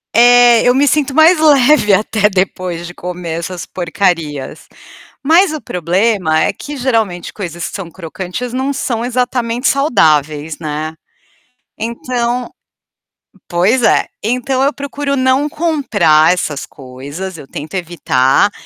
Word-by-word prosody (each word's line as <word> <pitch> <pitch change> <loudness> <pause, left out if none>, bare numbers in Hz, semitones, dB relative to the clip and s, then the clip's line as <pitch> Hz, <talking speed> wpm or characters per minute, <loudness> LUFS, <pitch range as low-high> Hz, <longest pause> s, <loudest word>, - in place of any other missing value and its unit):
É, 240 0 +6
eu 245 0 +3
me 285 +2 +3
sinto 290 -1 +1
mais 320 +2 +6
leve 290 -6 +4
até 210 +1 +2
depois 185 -3 -2
de 175 - -9
comer 175 -2 -5
essas 175 +1 -6
porcarias. 165 -5 -2 0.6
Mas 330 +4 +4
o 310 - -5
problema 180 -1 0
é - - +1
que 295 - -8
geralmente 225 -9 -1
coisas 170 -4 -6
que - - -8
são 185 -4 -7
crocantes, 185 +7 -6
não 265 +3 -2
são 240 -4 -2
exatamente 245 0 -1
saudáveis, 155 - +1
né. 155 0 -5 0.8
Então 240 +2 -3 1.0
pois 195 +9 +2
é, - - +3 0.2
então 255 +4 -1
eu 280 +2 +2
procuro 280 0 -4
não 260 +1 +2
comprar 220 - +2
essas 155 -6 -3
coisas, 145 +8 -8
eu 145 - -11
tento 150 +6 -8
evitar, 165 -3 +1
210 Hz, 130 wpm, -15 LUFS, 170-260 Hz, 1.0 s, É